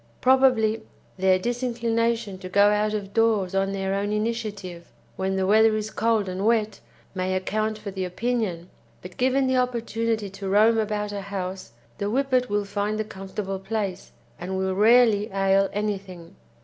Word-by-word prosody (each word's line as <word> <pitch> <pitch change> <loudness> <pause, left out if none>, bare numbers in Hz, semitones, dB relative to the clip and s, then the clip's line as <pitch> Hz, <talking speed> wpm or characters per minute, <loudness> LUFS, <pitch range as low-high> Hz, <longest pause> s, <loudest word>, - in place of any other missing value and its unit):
Probably 250 -4 +3 0.4
their 190 0 +3
disinclination 230 -2 -1
to 185 -1 -8
go 200 +2 +5
out 210 +1 +1
of 200 -1 -5
doors 215 -5 +2
on 195 0 +1
their 195 0 -2
own 200 +1 -1
initiative 210 -5 -4 0.2
when 190 0 -1
the 190 0 0
weather 220 +2 +5
is 215 0 -3
cold 225 -3 +1
and 185 +1 -3
wet 220 -1 +1 0.3
may 185 0 -1
account 215 +3 -1
for 210 -2 -7
the 190 -1 -4
opinion, 185 -2 -2 0.3
but 180 0 -10
given 260 +2 +2
the 260 0 +1
opportunity 230 -3 -1
to 195 0 -6
roam 220 +3 +4
about 210 -1 -2
a 200 -1 -4
house 190 -6 -6 0.3
the 200 - -1
Whippet 255 0 +1
will 205 0 0
find 205 +1 -2
a - - +1
comfortable 195 -1 -6
place, 195 -2 -4 0.3
and 190 +2 -4
will 190 0 0
rarely 215 0 +4
ail 195 0 +2
anything. 195 -4 -5
205 Hz, 160 wpm, -25 LUFS, 190-225 Hz, 0.4 s, go